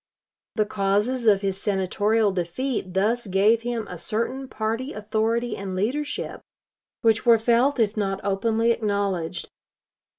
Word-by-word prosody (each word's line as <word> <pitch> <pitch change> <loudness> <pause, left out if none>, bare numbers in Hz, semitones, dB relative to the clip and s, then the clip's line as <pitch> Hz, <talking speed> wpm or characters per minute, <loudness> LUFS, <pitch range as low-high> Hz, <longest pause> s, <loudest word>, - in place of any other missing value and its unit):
The 215 - +2
causes 210 +5 0
of 200 -2 +5
his 195 -1 -2
Senatorial 205 +2 +1
defeat 185 +3 -3
thus 220 +4 +1
gave 205 +4 +3
him 235 -2 -3
a 180 - -8
certain 240 +8 -2
party 230 +4 -3
authority 220 +2 -1
and 195 -1 -5
leadership, 270 +10 -2 0.6
which 225 -1 +3
were 235 -1 +6
felt 240 +5 +2
if 215 -2 +2
not 195 -2 -1
openly 225 +4 +1
acknowledged. 200 -6 -2
215 Hz, 130 wpm, -24 LUFS, 195-235 Hz, 0.6 s, were